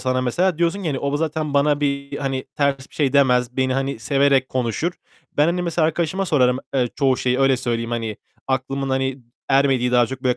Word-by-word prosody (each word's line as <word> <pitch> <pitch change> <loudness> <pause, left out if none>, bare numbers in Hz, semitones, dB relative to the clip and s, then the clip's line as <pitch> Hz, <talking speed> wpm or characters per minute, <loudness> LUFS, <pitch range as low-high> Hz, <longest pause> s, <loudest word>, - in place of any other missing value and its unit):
sana 130 0 0
mesela 170 +8 0
diyorsun 170 +3 +1
ki - - -4
hani 135 -3 -1
o 140 0 -1
zaten 155 -1 -2
bana 145 +1 +3
bir 140 -1 -2
hani 135 -2 -2
ters 140 -2 0
bir - - -20
şey 140 -3 +1
demez. 125 -3 +3
Beni 130 -1 +1
hani 135 -2 -2
severek 135 +1 +2
konuşur. 130 +7 -1 0.4
Ben 150 - +4
hani 180 +1 0
mesela 170 -2 +1
arkadaşıma 175 +4 -1
sorarım, 125 -5 +3 0.2
eee, 125 -2 +2
çoğu 135 -2 +2
şeyi, 125 +1 0
öyle 135 -1 +4
söyleyeyim 115 -1 -2
hani 115 -3 -3 0.3
aklımın 135 +1 -2
hani 130 0 -1 0.3
ermediği, 135 -3 +2
daha 120 -1 +4
çok 130 +1 -7
böyle 125 -1 +1
135 Hz, 205 wpm, -21 LUFS, 130-145 Hz, 0.4 s, Ben